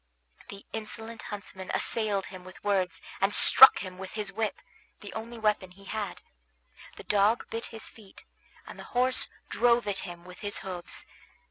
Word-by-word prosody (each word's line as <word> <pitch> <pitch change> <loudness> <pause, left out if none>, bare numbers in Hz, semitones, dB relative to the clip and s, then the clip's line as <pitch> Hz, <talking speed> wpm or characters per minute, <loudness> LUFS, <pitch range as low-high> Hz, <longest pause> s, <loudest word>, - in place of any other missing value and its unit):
The 200 0 -9
insolent 220 +1 -5
huntsman 190 -2 -7
assailed 210 -4 +1
him 185 -2 -9
with 185 +1 -13
words, 190 -3 +1 0.2
and 195 +1 +2
struck 265 - +9
him 185 -1 -8
with 190 0 -7
his 210 -2 -2
whip, 220 +1 -1 0.4
the - - -8
only 230 +2 -6
weapon 210 -4 +1
he 195 +2 -17
had; 205 -1 -4 0.7
the - - -10
dog 210 +3 +3
bit 225 +1 -2
his 225 -1 -7
feet, 205 -4 -13 0.4
and - - -10
the - - -7
horse 255 +1 +3 0.2
drove 240 -2 +3
at 200 -1 0
him 175 -2 -8
with 180 0 -12
his 205 -1 -2
hoofs. 180 -2 -5
205 Hz, 165 wpm, -29 LUFS, 190-220 Hz, 0.7 s, struck